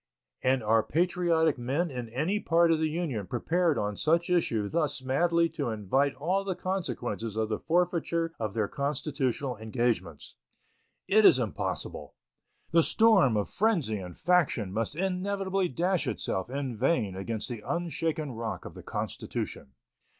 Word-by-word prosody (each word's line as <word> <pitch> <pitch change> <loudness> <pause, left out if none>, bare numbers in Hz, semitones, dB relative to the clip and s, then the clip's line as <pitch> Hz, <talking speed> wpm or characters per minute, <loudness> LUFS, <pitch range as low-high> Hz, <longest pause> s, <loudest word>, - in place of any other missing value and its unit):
And 130 -1 +2
are 110 +1 +4
patriotic 165 -1 +1
men 145 +8 -1
in 125 -3 -5
any 155 - 0
part 170 -3 +3
of 160 - +2
the 160 0 +1
Union 150 - -3
prepared 165 - +1
on 105 0 -1
such 170 - +1
issue 115 -12 +1
thus 150 -1 -1
madly 170 +6 +2
to 140 -6 -3
invite 115 +6 +1
all 180 +8 0
the 190 -2 -2
consequences 145 - -3
of 110 0 -1
the 110 - -1
forfeiture 170 -1 0
of 110 -3 -3
their 110 -3 +1
constitutional 140 -2 -2
engagements? 115 +2 -2 0.7
It 215 +2 +5
is 145 - +8
impossible. 115 -7 -4 0.6
The 165 0 +6
storm 190 - +4
of 105 - 0
frenzy 170 - +1
and 90 -2 -8
faction 155 - +2
must 115 +6 -2
inevitably 190 +1 -1
dash 175 +5 0
itself 95 +3 -2
in 135 -2 -3
vain 115 - +1
against 110 +3 -4
the 120 -4 -6
unshaken 165 -3 -2
rock 115 -2 -5
of - - -8
the - - -10
Constitution. 65 - -5
145 Hz, 150 wpm, -29 LUFS, 115-170 Hz, 0.7 s, is